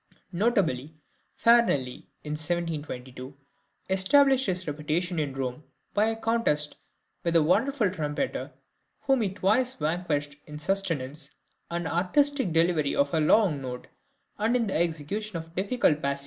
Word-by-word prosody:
Notably 170 - 0 0.4
Farinelli 230 - +3 0.2
in 150 - -6
1722 145 -5 -4 0.5
established 265 +8 +4
his 185 0 -1
reputation 160 +4 -2
in 140 -3 -2
Rome 130 +2 -4 0.3
by 210 - +3
a 225 - 0
contest 225 -11 0 0.5
with 170 -1 0
a 165 - +6
wonderful 220 - +2
trumpeter, 155 - -3 0.5
whom 270 -3 +2
he 205 - +1
twice 210 +7 +1
vanquished 150 -3 -2
in 150 - -9
the - - -7
sustenance 155 -5 -1 0.4
and 170 -1 -3
artistic 210 - +2
delivery 165 -2 +2
of 280 -9 +1
a 160 - +2
long 155 -2 +3
note, 125 -1 -7 0.5
and 225 +3 +2
in 240 -2 +2
the 200 - -2
execution 170 +5 -2
of 165 0 -9
difficult 190 -5 +1
passages. 140 0 -1
170 Hz, 135 wpm, -27 LUFS, 150-210 Hz, 0.5 s, a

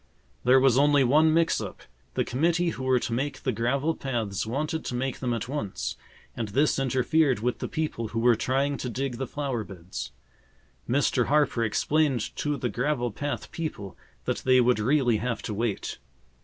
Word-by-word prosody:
There 130 +2 +6
was 130 -1 +4
only 145 -1 +5
one 155 +5 +5
mix 165 +1 +2
up. - - -7 0.3
The - - +1
committee 170 +6 +1
who 130 -5 -5
were 130 -1 +4
to 120 - -3
make 140 +3 -2
the 130 - +1
gravel 135 +8 0
paths 115 - -3
wanted 155 +7 -2
to 125 - -3
make 130 +1 -2
them 125 -2 -1
at 115 0 -2
once, 125 -8 -3 0.4
and 115 -2 -3
this 135 +8 +2
interfered 130 -1 +2
with 125 +1 -1
the - - -3
people 150 -8 -2
who 115 - -6
were 120 +1 +5
trying 135 +4 0
to 125 - -4
dig 130 +1 -3
the 135 0 -3
flower 135 -6 -3
beds. 90 -8 -7 0.8
Mr. 130 -1 +2
Harper 145 -5 +2
explained 135 +2 +1
to 150 -1 -1
the 125 - -1
gravel 125 -1 -1
path 145 +7 -4
people 155 - -5 0.3
that - - 0
they 130 -1 +4
would 125 -2 +3
really 125 0 +3
have 115 +1 -3
to 110 - -3
wait. 110 - -2
130 Hz, 185 wpm, -27 LUFS, 115-145 Hz, 0.8 s, There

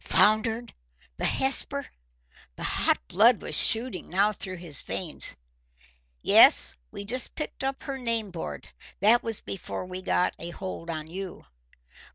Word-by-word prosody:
"Foundered? 220 +2 +3 0.4
The - - -1
Hesper?" 275 +1 +1 0.7
The - - -7
hot - - +2
blood 230 - +5
was - - -7
shooting 225 -5 +2
now 200 +4 +3
through 190 -2 -5
his 170 -5 -2
veins. 175 -5 0 0.9
"Yes, - - +6
we 200 - -7
just 250 +5 -3
picked 305 - -6
up 270 0 -3
her 275 -2 -5
name 230 -4 -2
board. 75 - -7 0.3
That 225 +4 +5
was 225 -2 -4
before 190 -1 -6
we 185 0 -6
got 180 - +1
a 170 - -5
hold 175 -1 -7
on 155 -2 -4
you." 185 +3 -7
205 Hz, 145 wpm, -27 LUFS, 180-235 Hz, 0.9 s, Yes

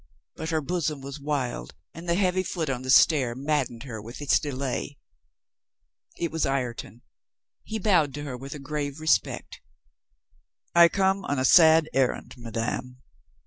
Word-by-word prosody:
But 160 - -5
her 160 -2 0
bosom 155 -2 -2
was 140 +2 -7
wild 130 - -3 0.2
and 170 +2 -8
the 170 - +3
heavy 185 -1 +2
foot 165 -5 -3
on 125 -2 -3
the 130 - -7
stair 130 -3 +5
mad 140 0 0
dened 120 0 -11
her 115 -6 -7
with 115 +4 -10
its 145 -2 +3
delay. 140 0 -4 1.2
It 170 -3 -2
was 160 0 -1
Ireton. 125 -3 -3 0.6
He 220 - -4
bowed 180 -9 +2
to 145 - -5
her 140 -4 -5
with 135 +3 -8
a - - -6
grave 145 +1 -4
re 155 - -8
spect. 160 - 0 1.1
"I 170 0 +7
come 195 +1 +1
on 145 - -1
a 130 - +1
sad 160 0 +7
errand, 135 -2 0
madame. 120 +2 -5
145 Hz, 165 wpm, -26 LUFS, 130-160 Hz, 1.2 s, I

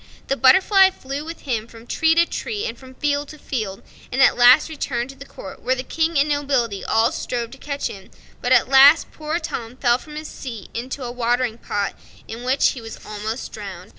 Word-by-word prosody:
The 275 - +2
butterfly 380 +9 +6
flew 275 -5 -6
with 330 +1 -8
him 230 -5 -2
from 230 0 -14
tree 320 +6 +2
to 340 +1 +5
tree 425 +3 -4
and 230 - -4
from 260 +1 -15
field 290 +1 -1
to 305 - -10
field, 215 -9 -4 0.3
at 265 +1 +4
last 245 +4 +7
returned 270 -5 -3
to - - -15
the 280 +1 -12
court, 190 - -10
where 255 - +1
the 255 - -4
King 325 +3 -1
and 280 +2 +3
nobility 275 -8 0
all 225 +1 +2
strove 235 -2 -4
to 270 - -12
catch 285 0 -4
him; 195 -2 -6 0.3
but 245 - -1
at 255 -1 +5
last 275 +4 +7
poor 310 +1 -3
Tom 245 -8 -5
fell 240 -2 +2
from 300 +1 -12
his 305 0 -6
seat 230 -7 -8
into 255 +3 -5
a 240 - -4
watering 240 -1 0
pot, 205 -1 -2 0.3
in 230 +2 -7
which 260 +2 +3
he 250 - -8
was 225 0 -8
almost 215 +3 -5
drowned. 195 -3 -8
260 Hz, 210 wpm, -22 LUFS, 230-290 Hz, 0.3 s, last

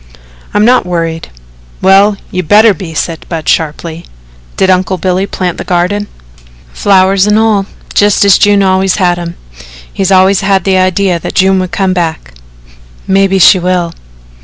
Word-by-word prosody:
"I'm 210 +1 +3
not 250 +2 +3
worried." 165 -2 -3 0.5
"Well, 200 +2 +3
you 185 - -2
better 210 +5 +4
be," 175 -5 -9
said 165 +1 -4
Budd 160 -3 -5
sharply. 160 +1 -2 0.5
"Did 190 - +2
Uncle 185 +1 0
Billy 185 +2 -1
plant 180 -4 -4
the - - -4
garden?" 185 +4 -1 0.7
"Flowers 195 - +2
and 210 0 +2
all, 215 -3 +1 0.3
just 205 0 +2
as 200 - +4
June 205 -1 +3
always 190 0 +1
had 175 -3 0
'em. 170 0 -7 0.6
He's 195 0 -1
always 190 +1 +3
had 195 -2 +1
the 190 -1 +1
idea 185 -1 0
that - - -7
June 190 0 +2
would 185 -1 -4
come 190 -2 -1
back." 165 - -4 0.7
"Maybe 195 0 +2
she 190 +1 +5
will." 175 -1 -2
190 Hz, 160 wpm, -10 LUFS, 175-195 Hz, 0.7 s, she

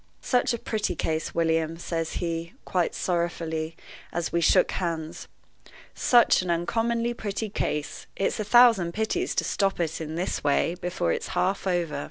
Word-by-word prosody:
"Such 250 -1 +2
a 235 - -1
pretty 215 -5 -2
case, 160 0 -2
William," 165 -1 +1
says 165 -1 -3
he, 170 -1 -3
quite 180 -3 0
sorrowfully, 165 -2 -2 0.3
as 170 -1 -2
we 170 - +2
shook 185 +2 +4
hands 165 -3 -4 0.7
"such 240 -5 +4
an 180 - -5
uncommonly 230 +7 0
pretty 215 -1 -4
case 150 -6 -3
it's 195 - -1
a - - 0
thousand 220 -7 +5
pities 220 - -1
to - - +1
stop 195 -2 0
it, 165 -1 -2
in 160 0 -5
this 180 +3 -2
way, 145 +3 +2
before 175 - -1
it's - - -3
half 195 +1 0
over!" 175 -5 0
175 Hz, 160 wpm, -26 LUFS, 165-205 Hz, 0.7 s, thousand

